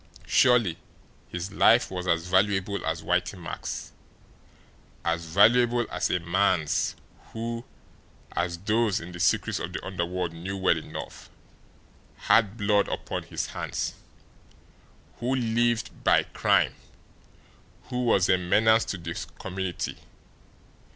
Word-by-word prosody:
Surely 115 -9 +3 0.5
his 90 +2 -5
life - - +4
was 90 -1 -4
as 85 -1 +1
valuable 95 +1 +1
as 80 0 -2
Whitey 90 +2 0
Mack's, 85 - -6 1.1
as 85 0 0
valuable 120 +7 +4
as - - -1
a 90 - +1
man's 85 -2 +1 0.4
who, 115 +1 -4 0.7
as 85 0 -2
those 105 +2 +1
in 85 +2 -9
the 90 - -9
secrets - - +1
of 85 +1 -5
the - - -5
underworld 90 -2 -3
knew 90 +4 -5
well 95 -2 +3
enough, - - -9 0.9
had 110 -1 +3
blood 100 -1 +2
upon - - -4
his - - -4
hands, - - -4 1.3
who 125 +3 0
lived 120 -1 0
by - - +4
crime, - - +2 1.2
who 125 0 -1
was 95 -6 +3
a 95 - +3
menace 110 +5 +3
to 95 - -4
the 85 -1 -5 0.2
community! 95 -1 -4
95 Hz, 120 wpm, -27 LUFS, 85-110 Hz, 1.3 s, life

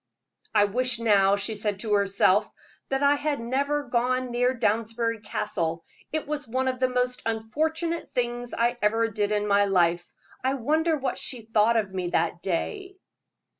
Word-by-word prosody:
"I 205 - +6
wish 250 +4 0
now," 200 -3 +4
she 205 +2 -2
said 205 -1 -2
to 215 -2 -1
herself, 200 0 +3 0.4
"that 270 +1 0
I 285 0 +5
had 290 -1 -1
never 280 +5 -1
gone 255 0 0
near 245 +1 +2
Downsbury 230 -1 -1
Castle: 170 -6 -3 0.3
it 310 0 -2
was 295 -2 -4
one 260 +3 -1
of 255 -1 -1
the 255 0 +2
most 250 0 -1
unfortunate 315 +10 -2
things 240 0 -2
I 240 +1 +1
ever 225 +2 +2
did 205 -1 -1
in 210 0 +1
my 205 0 +3
life. 175 -3 +1 0.3
I 265 +1 +1
wonder 310 +5 +1
what 270 -1 -3
she 245 -4 -2
thought 225 +1 +3
of 200 -4 -1
me 185 -2 -2
that 170 0 0
day?" 380 - -3
230 Hz, 170 wpm, -26 LUFS, 205-260 Hz, 0.4 s, I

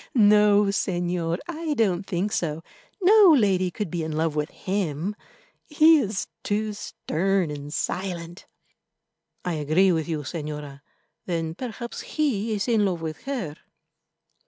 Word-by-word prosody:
no, 210 -2 +6
Señor, 175 -4 -1
I 325 -2 -3
don't 195 -5 +1
think 195 +2 -1
so; 165 -4 -2 0.4
no 390 -3 +7
lady 190 -5 +2
could 195 -1 -5
be 175 - -2
in 160 - -3
love 160 0 0
with 150 0 -1
him—he 210 - 0
is 210 -6 -2 0.2
too 210 +1 -1
stern 190 -3 -1
and 145 0 -7
silent." 175 0 -4 1.0
"I 180 - -1
agree 160 +5 +3
with 160 -2 0
you, 155 -2 -1
Señora. 150 -1 -6 0.5
Then 165 -2 -2
perhaps 235 +3 -6
he 230 -8 -1
is 205 - -2
in 225 -3 +3
love 180 -4 -1
with 155 -2 -6
her." 230 - -4
190 Hz, 135 wpm, -25 LUFS, 165-215 Hz, 1.0 s, no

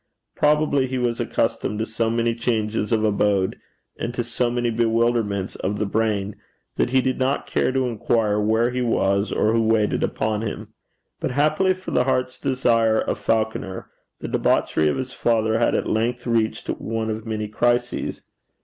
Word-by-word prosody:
Probably 150 -3 +2
he 130 0 -3
was 120 -2 -1
accustomed 105 - -1
to 110 - -1
so 115 0 -1
many 115 0 +1
changes 110 -2 -1
of 110 -1 +2
abode, 100 -2 +1 0.4
and 115 - -2
to 120 - -1
so 120 +1 -1
many 120 0 0
bewilderments 115 -3 0
of 100 +2 -2
the 105 - 0
brain, 105 -1 -1 0.4
that - - +1
he 130 +1 +3
did 130 0 -1
not 130 +2 0
care - - 0
to 130 0 0
inquire 110 -2 +1
where 110 +3 +2
he 125 0 -2
was 100 -4 +1
or 110 - +2
who 115 - +3
waited 110 -1 +2
upon 110 -1 -1
him. 110 -2 -5 0.5
But - - -2
happily 155 +8 +2
for 185 0 -8
the 125 - +2
heart's 130 -1 -1
desire 115 -4 +2
of - - -2
Falconer, 110 -4 -2 0.3
the - - -4
debauchery 80 - +1
of 75 - +1
his 130 -1 -4
father 110 -1 +1
had 120 - +2
at - - 0
length 120 +3 -1
reached 110 -2 0
one 110 0 -2
of 110 +1 -5
many 110 -1 -2
crises. 120 +3 -1
115 Hz, 175 wpm, -23 LUFS, 110-125 Hz, 0.5 s, he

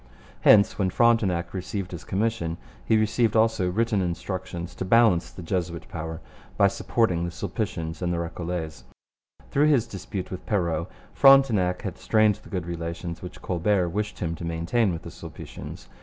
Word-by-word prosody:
Hence, 100 0 +5
when 95 -2 +2
Frontenac 95 -5 +2
received 95 0 -4
his 85 - -7
commission, 100 -5 -1 0.3
he 110 - +3
received 110 +1 +2
also 110 -4 +3
written 105 +1 +1
instructions 90 0 -4
to - - -5
balance 95 -4 +4
the 90 - -10
Jesuit 85 -1 -3
power 80 0 -5 0.4
by - - +5
supporting 90 -8 0
the 85 - -2
Sulpicians 85 -3 -4
and 90 -1 0
the 85 - 0
Recollets. 85 -1 -4 0.7
Through 145 +2 +4
his 135 -6 +4
dispute 95 -3 -6
with 95 - -6
Perrot, 85 -4 0 0.3
Frontenac 120 -10 +5
had 95 - -5
strained 110 -2 +3
the - - -15
good 90 -3 -3
relations 85 0 -5
which 90 - -9
Colbert 90 0 +1
wished 105 +4 -3
him 85 -2 -2
to - - -8
maintain 85 +6 +1
with 85 -1 -5
the - - -8
Sulpicians. - - -9
90 Hz, 160 wpm, -26 LUFS, 85-110 Hz, 0.7 s, Hence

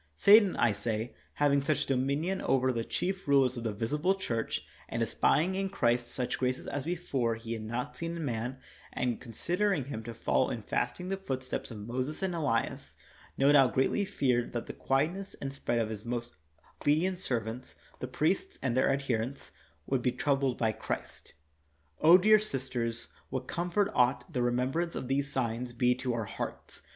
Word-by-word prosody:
Satan, 200 - +7
I 120 - +3
say, 110 +3 -3 0.2
having 140 -1 +3
such 145 +2 0
dominion 140 +8 0
over 130 -1 +2
the 115 -1 -1
chief 190 +8 -3
rulers 135 -3 +4
of 120 - -5
the 115 - -1
visible 150 - 0
church, 115 -12 -2 0.2
and - - 0
espying 175 +5 +2
in 195 0 -1
Christ 120 -8 +1
such 125 0 -3
graces 130 0 -1
as 145 - -3
before 140 -9 -1
he 115 0 -5
had 110 - -4
not 120 +3 -4
seen 170 +3 -4
in 165 - -3
man, 120 +1 -2 0.3
and 125 -2 -1
considering 175 - 0
him 115 -5 -5
to 115 -1 -6
follow 115 - +1
in - - -4
fasting 180 +1 -2
the 195 - -1
footsteps 130 -9 -4
of 105 -4 -7
Moses 130 - -3
and 190 -2 0
Elias, 145 -9 -1 0.4
no 140 +1 +5
doubt 135 -6 +5
greatly 135 +10 +2
feared 130 -11 0
that 120 - -3
the - - -7
quietness 165 +9 -1
and 135 - -5
rest 120 -3 -1
of 110 -1 0
his 110 -1 -6
most 120 -4 -4 0.5
obedient 175 +5 +2
serv 120 -10 -1
ants, 125 +3 -7 0.2
the 125 - -4
priests, 155 +8 0
and 130 -3 -1
their 130 - +3
adherents, 135 -1 -2 0.3
would 135 +4 0
be 125 - +2
troubled 135 -1 +1
by 110 -2 +2
Christ. 60 -11 -6 0.9
dear 215 +2 +7
sisters, 125 - -3 0.2
what 130 -1 -4
comfort 180 +4 0
ought 125 +7 +2
the 130 - 0
remem 125 +1 +1
brance 170 +3 -1
of 130 - -4
these 140 +1 0
signs 125 -2 -1
to - - -19
be 125 +1 +3
to 125 -1 -2
our 115 -2 -2
hearts - - -6
130 Hz, 185 wpm, -30 LUFS, 120-155 Hz, 0.9 s, Satan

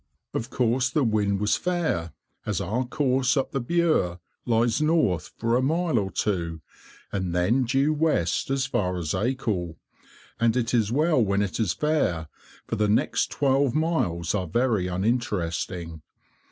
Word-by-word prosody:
Of 115 - -3
course 125 0 +1
the 150 +1 +1
wind 105 -4 +1
was 105 0 +2
fair, 165 - -1 0.3
as 105 -3 -2
our 110 +7 -1
course 130 0 +1
up 135 - 0
the 135 - -1
Bure 135 - +1 0.3
lies 115 +3 +2
north 150 - +1
for 115 +1 +1
a 125 - +3
mile 160 -1 +1
or 95 -2 -2
two, 85 -6 -2 0.5
and 95 -3 -2
then 115 +9 +2
due 135 +5 +2
west 150 - 0
as 135 -1 +1
far 90 -9 -1
as 80 -4 -2
Acle; 100 -6 -1 0.6
and 115 +1 +2
it 120 -1 -1
is 110 -3 +2
well 150 -1 +3
when 100 0 +1
it 100 +1 -4
is 110 - +1
fair, 90 - 0 0.4
for - - -3
the 105 0 +1
next 105 - +1
twelve 135 -2 +1
miles 120 - 0
are 95 -3 -1
very 110 0 +1
uninteresting. 90 - -2
115 Hz, 155 wpm, -25 LUFS, 90-135 Hz, 0.6 s, a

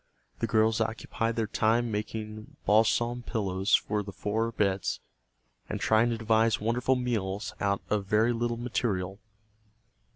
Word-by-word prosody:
The - - 0
girls 110 0 +3
occupied 115 +1 -2
their 115 - 0
time 115 +2 +1
making 110 0 -5
balsam 120 +3 +3
pillows 100 -5 +1
for 105 0 0
the 100 0 -7
four 110 +4 -1
beds, 100 -4 0 0.7
and - - -3
trying 110 +2 +3
to 115 - -1
devise 110 -1 +2
wonderful 120 +4 +1
meals 105 -5 -2
out 100 0 0
of 105 -2 -1
very 110 +4 +3
little 120 0 -1
material. 100 -5 -2
110 Hz, 135 wpm, -29 LUFS, 105-115 Hz, 0.7 s, girls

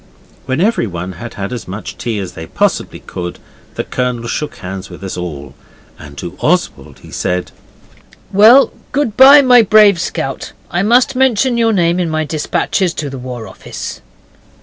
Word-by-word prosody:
When 130 +2 -1
everyone 100 - -1
had 110 +6 -9
had 100 +4 -4
as 120 - -6
much 100 +4 -7
tea 115 -3 -3
as 95 -3 -4
they 80 - -8
possibly - - -1
could, 90 -1 -6 0.4
the - - -2
Colonel 125 -2 -3
shook 145 +2 -3
hands 95 -4 -7
with - - -11
us 95 - -5
all, 75 -6 -6 0.5
and 70 -2 -12
to - - -7
Oswald - - -1
he - - -13
said 90 0 -2 0.8
'Well, 225 +7 +6 0.2
good 265 -7 0
bye, 280 +2 +8
my 250 -2 +7
brave 210 -4 +5
scout. 135 -7 -4 0.2
I 175 - 0
must 245 +6 +3
mention 255 -1 +2
your 230 -1 +2
name 175 -3 +1
in 175 -2 -1
my 155 0 -1
dispatches 165 +4 -1
to 145 -3 -4
the 135 - -7
War 125 -3 -7
Office. - - -8
145 Hz, 170 wpm, -15 LUFS, -, 0.8 s, bye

